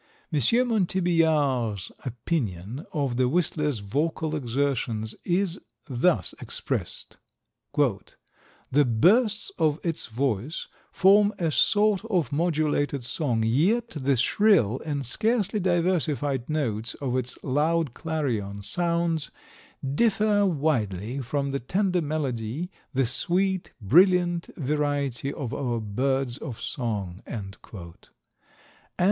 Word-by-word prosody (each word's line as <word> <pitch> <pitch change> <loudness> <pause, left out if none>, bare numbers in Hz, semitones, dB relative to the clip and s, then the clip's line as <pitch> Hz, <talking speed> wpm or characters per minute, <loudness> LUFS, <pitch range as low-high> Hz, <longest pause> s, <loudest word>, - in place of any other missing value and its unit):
M. 150 - +3 0.3
Montbeillard's 160 - +1
opinion 120 - -3
of 140 -5 -1
the 125 -1 +3
whistler's 150 -4 0
vocal 155 +8 -1
exertions 120 -5 -1
is 180 0 0 0.2
thus 125 - +1
expressed: - - -4 0.6
"The 140 +2 -2
bursts 205 - +3
of 155 0 +2
its 165 -2 -1
voice 125 +3 -2 0.2
form 205 +2 +5
a 165 -3 0
sort 205 +4 +3
of 180 -9 0
modulated 145 -3 0
song, 120 -3 0
yet 185 - +2
the 140 -7 0
shrill 130 - +3
and 145 -3 -3
scarcely 215 - +1
diversified 165 - 0
notes 115 -8 -2
of 130 -3 -3
its 125 -1 -2
loud 150 +1 +1
clarion 120 -12 -3
sounds 170 - 0 0.6
differ 205 - +2
widely 125 - -1
from 140 +2 -2
the 140 - -1
tender 180 - 0
melody, 145 - -3 0.2
the 135 -1 +1
sweet, 180 +10 0
brilliant 175 - +4
variety 145 -2 -1
of 140 -6 -5
our 120 -4 -1
birds 130 +4 -1
of 120 -4 -6
song." 105 -7 -3
And 100 -3 -6 0.2
M. 85 -5 -9
145 Hz, 105 wpm, -26 LUFS, 120-175 Hz, 0.6 s, form